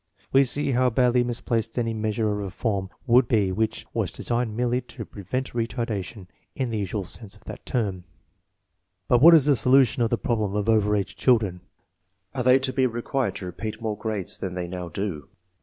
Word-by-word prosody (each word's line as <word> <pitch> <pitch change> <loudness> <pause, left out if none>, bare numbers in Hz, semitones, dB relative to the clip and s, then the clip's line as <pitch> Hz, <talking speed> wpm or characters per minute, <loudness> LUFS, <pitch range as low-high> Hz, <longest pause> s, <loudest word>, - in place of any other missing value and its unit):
We 135 +1 +6
see 140 +2 +1
how 125 0 +3
badly 125 0 +3
misplaced 115 -1 -2
any 115 -2 0
measure 110 0 -1
of 105 - -2
reform 100 0 -2 0.2
would 125 0 +5
be 105 -6 +2
which 110 +3 -2
was - - -1
designed 120 -2 -2
merely 125 +1 +1
to 120 -2 -9
"pre 100 - -11
vent 130 +8 -3
retardation/' 115 -4 -3 0.3
in 130 -5 -2
the 110 - -1
usual 100 +1 -2
sense 105 +3 -6
of 105 - -24
that - - -10
term. 100 -8 -2 1.0
But 120 -1 +4
what 165 +3 +10
is 150 -4 +5
the 145 -2 +4
solution 130 -1 +4
of 115 - +2
the 120 - +1
problem 105 -3 -1
of 105 0 -1
over 105 -2 +3
age 100 -2 -2
children? 105 -8 +2 0.7
Are 130 - -2
they 125 +1 +6
to 130 -1 -1
be 130 -1 +3
required 125 +3 -2
to 95 - -6
repeat 105 +5 -6
more 110 -2 -2
grades 105 -4 -3
than 90 -2 -4
they 90 -1 -3
now 90 -1 -6
do? 85 -8 -4
115 Hz, 195 wpm, -25 LUFS, 100-125 Hz, 1.0 s, what